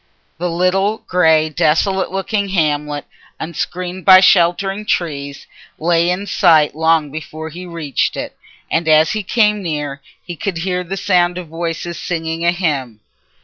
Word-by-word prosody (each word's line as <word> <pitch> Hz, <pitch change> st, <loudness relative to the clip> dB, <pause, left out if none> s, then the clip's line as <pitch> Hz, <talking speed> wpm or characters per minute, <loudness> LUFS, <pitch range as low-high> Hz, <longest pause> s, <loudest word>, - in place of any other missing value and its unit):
The 175 Hz, +1 st, -1 dB
little, 190 Hz, +5 st, 0 dB
grey, 160 Hz, -3 st, +3 dB
desolate 175 Hz, +5 st, +1 dB
looking 200 Hz, +1 st, -2 dB
hamlet, 150 Hz, -5 st, -1 dB, 0.3 s
unscreened 180 Hz, +3 st, -5 dB
by 185 Hz, -1 st, +9 dB
sheltering 195 Hz, +2 st, +3 dB
trees, 140 Hz, -8 st, -3 dB, 0.3 s
lay 170 Hz, +1 st, +2 dB
in 180 Hz, +3 st, -2 dB
sight 165 Hz, -7 st, +3 dB
long 160 Hz, -1 st, +1 dB
before 155 Hz, +1 st, -7 dB
he 180 Hz, +3 st, -9 dB
reached 160 Hz, -6 st, -2 dB
it, -, -, -5 dB, 0.4 s
and 165 Hz, 0 st, 0 dB
as 155 Hz, 0 st, +5 dB
he 215 Hz, -, -2 dB
came 210 Hz, 0 st, +1 dB
near 145 Hz, -5 st, -4 dB, 0.2 s
he 175 Hz, -, -6 dB
could 180 Hz, +2 st, -3 dB
hear 180 Hz, +1 st, -2 dB
the 190 Hz, +3 st, -5 dB
sound 180 Hz, -2 st, +1 dB
of 180 Hz, -3 st, -7 dB
voices 170 Hz, +1 st, -4 dB
singing 165 Hz, -1 st, -3 dB
a 170 Hz, -, +4 dB
hymn. 145 Hz, -, -2 dB
170 Hz, 145 wpm, -17 LUFS, 155-185 Hz, 0.4 s, by